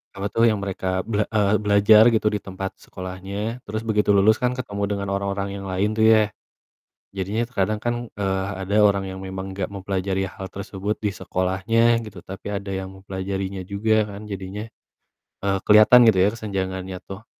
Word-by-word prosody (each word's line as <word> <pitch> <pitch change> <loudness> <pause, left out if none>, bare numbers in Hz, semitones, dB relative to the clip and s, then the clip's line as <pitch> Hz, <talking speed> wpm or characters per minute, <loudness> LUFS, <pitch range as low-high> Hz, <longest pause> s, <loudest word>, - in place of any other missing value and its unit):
apa 100 +1 -2
tuh 115 +1 +4
yang 110 -3 +2
mereka 95 -1 -2
bel 105 -1 -1
eee, 105 -2 +2
belajar 105 +1 +6
gitu 110 -1 +2
di 105 - -1
tempat 95 0 -6
sekolahnya 100 +5 -6
terus 110 +2 -3
begitu 105 -2 +2
lulus 110 +3 +4
kan 125 0 0
ketemu 100 -5 -4
dengan 100 -1 -3
orang-orang 100 0 -2
yang 100 - -7
lain 95 +3 0
tuh 110 - +4
ya, 110 -1 +6 0.9
jadinya 100 +5 -1
kadang 105 -3 -1
kan, 120 +2 -1 0.3
eee, 95 -1 0
ha 100 - -4
ada 100 +2 -2
orang 100 -1 +3
yang 95 0 -6
memang 95 0 -6
enggak 95 -1 -3
mempelajari 95 -1 -2
hal 95 0 -8
tersebut 100 +1 -4
di 105 - +1
sekolahnya 115 +6 +1
gitu 100 -4 -10
tapi 95 +1 -9
ada 100 -1 -4
yang 95 0 -4
mempelajarinya 95 0 -4
juga 105 +3 +1
kan 100 +2 -9
jadinya, 100 +2 -6 0.8
eee, 95 0 +2
keliatan 110 +4 +8
gitu 110 -4 +5
ya 100 - +4
kesenjangannya 95 -4 -4
tuh 100 +4 -9
100 Hz, 175 wpm, -23 LUFS, 95-105 Hz, 0.9 s, keliatan